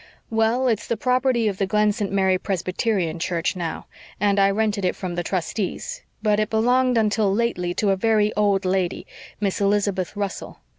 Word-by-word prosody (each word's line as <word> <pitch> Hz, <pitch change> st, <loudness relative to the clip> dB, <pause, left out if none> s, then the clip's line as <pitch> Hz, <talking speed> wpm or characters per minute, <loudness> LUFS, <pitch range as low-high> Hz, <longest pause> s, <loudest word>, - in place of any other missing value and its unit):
"Well, 225 Hz, +3 st, +2 dB
it's 225 Hz, -3 st, 0 dB
the 235 Hz, -, -1 dB
property 250 Hz, -1 st, +1 dB
of 195 Hz, -2 st, -2 dB
the 195 Hz, -, +1 dB
Glen 210 Hz, +1 st, +3 dB
St. 205 Hz, -2 st, -3 dB
Mary 190 Hz, -2 st, +2 dB
Presbyterian 185 Hz, -2 st, -1 dB
Church 170 Hz, 0 st, -1 dB
now, 170 Hz, -3 st, -4 dB, 0.3 s
and 200 Hz, 0 st, +2 dB
I 195 Hz, 0 st, +5 dB
rented 205 Hz, 0 st, 0 dB
it 180 Hz, -, +1 dB
from 185 Hz, -2 st, -5 dB
the 175 Hz, -, -2 dB
trustees. 190 Hz, -, -3 dB, 0.2 s
But 210 Hz, -1 st, +2 dB
it 215 Hz, -, 0 dB
belonged 245 Hz, +3 st, +2 dB
until 215 Hz, -2 st, +2 dB
lately 195 Hz, -5 st, -1 dB
to 205 Hz, -2 st, +1 dB
a -, -, +3 dB
very 215 Hz, +1 st, +2 dB
old 200 Hz, -2 st, +1 dB
lady, 185 Hz, -1 st, -1 dB, 0.3 s
Miss 200 Hz, -1 st, -1 dB
Elizabeth 200 Hz, -2 st, 0 dB
Russell. 200 Hz, -1 st, -4 dB
205 Hz, 180 wpm, -23 LUFS, 190-220 Hz, 0.3 s, I